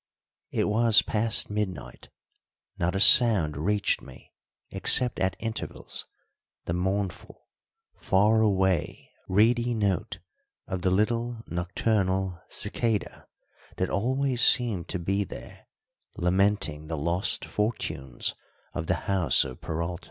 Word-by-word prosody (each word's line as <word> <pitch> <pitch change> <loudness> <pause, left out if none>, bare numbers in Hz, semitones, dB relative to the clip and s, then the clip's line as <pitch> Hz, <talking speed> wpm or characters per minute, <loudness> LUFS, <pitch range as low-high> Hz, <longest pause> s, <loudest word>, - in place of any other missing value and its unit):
It - - 0
was 110 +1 +4
past 110 -1 +1
midnight: 105 -3 -5 0.7
not 90 +2 0
a - - 0
sound 100 - +6
reached 100 +7 0
me 65 -2 -15 0.4
except 125 -1 +2
at 95 -2 0
intervals 115 0 -4 0.6
the 85 - -2
mournful, 95 +1 -3 0.5
far 105 +4 +3
away, 95 -4 0 0.2
reedy 120 +4 +2
note 100 -5 -1 0.5
of 95 -1 -4
the 95 - +1
little 115 +4 0
nocturnal 95 0 -1
cicada 110 0 -2 0.5
that 95 - -1
always 130 +3 0
seemed 110 -9 +3
to - - -2
be 95 +4 -1
there - - -11 0.5
lamenting 90 -4 0
the 80 0 -4
lost 85 +8 0
fortunes 105 - -3 0.4
of 85 -2 -4
the 90 - +2
house 95 -7 +3
of 65 -2 -9
Peralta. 85 +2 -4
95 Hz, 115 wpm, -27 LUFS, 90-110 Hz, 0.7 s, sound